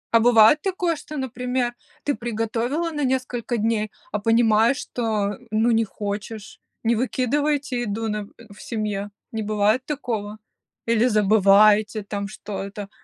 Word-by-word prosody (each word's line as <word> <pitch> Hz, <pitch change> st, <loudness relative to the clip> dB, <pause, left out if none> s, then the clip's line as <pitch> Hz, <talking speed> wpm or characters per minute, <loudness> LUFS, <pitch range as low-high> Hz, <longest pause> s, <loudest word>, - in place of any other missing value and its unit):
А 230 Hz, -, +7 dB
бывает 230 Hz, +4 st, +6 dB
такое, 360 Hz, -3 st, 0 dB
что, 305 Hz, -, -9 dB
например, 250 Hz, -1 st, -2 dB, 0.3 s
ты 285 Hz, -, 0 dB
приготовила 240 Hz, +7 st, -2 dB
на 295 Hz, -2 st, -2 dB
несколько 255 Hz, -2 st, -1 dB
дней, 215 Hz, -1 st, 0 dB, 0.2 s
а 210 Hz, -, -1 dB
понимаешь, 225 Hz, +3 st, +3 dB
что, 215 Hz, -5 st, -2 dB
ну, 220 Hz, +2 st, +2 dB
не 225 Hz, 0 st, +3 dB
хочешь? 210 Hz, +1 st, -6 dB, 0.2 s
Не 235 Hz, +1 st, +2 dB
выкидываете 265 Hz, +2 st, 0 dB
еду 225 Hz, 0 st, -2 dB
на 210 Hz, -1 st, -3 dB, 0.3 s
в 205 Hz, -, -14 dB
семье, 210 Hz, -3 st, -3 dB, 0.2 s
не 225 Hz, -, -3 dB
бывает 215 Hz, +4 st, +1 dB
такого? 225 Hz, -8 st, -4 dB, 0.5 s
Или 230 Hz, 0 st, +3 dB
забываете, 210 Hz, 0 st, +4 dB
там, 200 Hz, 0 st, -4 dB
что 210 Hz, 0 st, -6 dB
это? 200 Hz, +1 st, -7 dB
225 Hz, 140 wpm, -23 LUFS, 210-250 Hz, 0.5 s, А